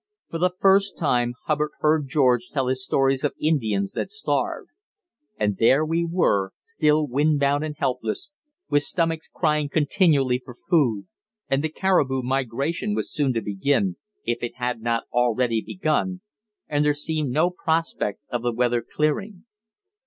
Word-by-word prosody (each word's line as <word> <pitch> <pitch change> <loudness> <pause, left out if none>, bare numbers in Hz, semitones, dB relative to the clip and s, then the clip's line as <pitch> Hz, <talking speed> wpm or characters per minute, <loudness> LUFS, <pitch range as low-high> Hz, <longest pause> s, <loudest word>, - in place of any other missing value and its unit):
For 165 - -3
the 180 +1 +1
first 195 +1 +3
time 120 -6 +1
Hubbard 150 -1 0
heard 150 -2 +2
George 125 -3 +2
tell 135 -3 -1
his 130 0 -1
stories 135 0 +1
of 145 - 0
Indians 110 -11 0
that - - -3
starved. 430 0 -2 0.7
And 105 -2 0
there 135 +7 +4
we 165 +2 0
were 165 - +1
still 155 - +2
windbound 145 +1 +1
and 155 -1 -4
helpless, 125 - -2 0.4
with 145 - +3
stomachs 165 +2 0
crying 150 -3 0
continually 145 -5 +2
for 125 - -11
food. 125 - +1 0.4
And 135 +2 +1
the 160 - 0
caribou 150 -7 +1
migration 135 - -1
was - - -3
soon 145 -4 +1
to 115 -2 -2
begin, 100 -1 0 0.3
if 120 0 -1
it 120 - -4
had 125 -2 -3
not 115 0 0
already 120 -1 +2
begun, 185 - -1 0.5
and 145 0 +1
there 150 -1 +2
seemed 150 -1 -1
no 155 +8 +2
prospect 165 - -1
of 120 - -1
the 120 0 0
weather 120 0 +1
clearing. 185 - -2
145 Hz, 150 wpm, -24 LUFS, 120-160 Hz, 0.7 s, there